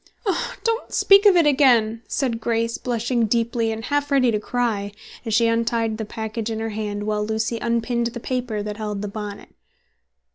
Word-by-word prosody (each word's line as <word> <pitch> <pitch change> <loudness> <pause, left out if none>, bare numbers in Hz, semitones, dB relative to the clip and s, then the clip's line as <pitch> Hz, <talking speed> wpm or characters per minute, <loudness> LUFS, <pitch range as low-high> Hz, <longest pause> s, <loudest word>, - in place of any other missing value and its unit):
"Oh, 380 -4 -1
don't 460 +1 -1
speak 400 +1 +6
of 390 - +6
it 340 -3 +5
again!" 240 -6 +4
said 240 -5 -1
Grace 230 +1 -1
blushing 235 -1 0
deeply 230 0 0
and 225 +1 -5
half 290 +1 0
ready 265 -4 +3
to 210 - 0
cry, 210 -3 -2 0.3
as 220 - +1
she 230 0 +4
untied 230 -1 0
the 220 - -3
package 220 +1 -4
in 220 -1 -3
her 225 0 -2
hand, 205 -1 -4
while 210 0 -1
Lucy 220 +2 -2
unpinned 235 0 0
the 240 +1 -6
paper 245 -4 -3
that 210 0 -5
held 210 -2 -4
the - - -2
bonnet. 205 0 -7
230 Hz, 185 wpm, -22 LUFS, 215-245 Hz, 0.3 s, speak